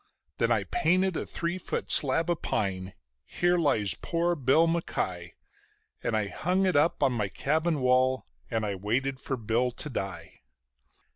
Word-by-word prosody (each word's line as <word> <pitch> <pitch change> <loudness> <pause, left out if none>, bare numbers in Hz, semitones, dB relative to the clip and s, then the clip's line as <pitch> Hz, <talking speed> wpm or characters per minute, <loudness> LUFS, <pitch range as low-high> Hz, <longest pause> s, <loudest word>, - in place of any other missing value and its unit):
Then - - +2
I - - +2
painted 190 - +1
a - - -3
three 170 +2 -3
foot - - -4
slab 165 +5 +4
of 170 - -2
pine: 95 -2 -2 0.3
"Here 175 - +1
lies 110 - +2
poor 170 +1 -1
Bill 140 +3 +4
MacKie", 90 - -2 0.7
And 110 - 0
I 105 - 0
hung 180 - 0
it 185 - +1
up 150 +1 +2
on 135 -2 +3
my 105 -4 -1
cabin 155 - 0
wall 130 +1 +2 0.2
and 115 -2 -1
I 100 - -1
waited 125 +8 -1
for 135 0 -3
Bill 115 +2 0
to 150 +5 -7
die. 95 -6 -6
135 Hz, 160 wpm, -28 LUFS, 110-165 Hz, 0.7 s, slab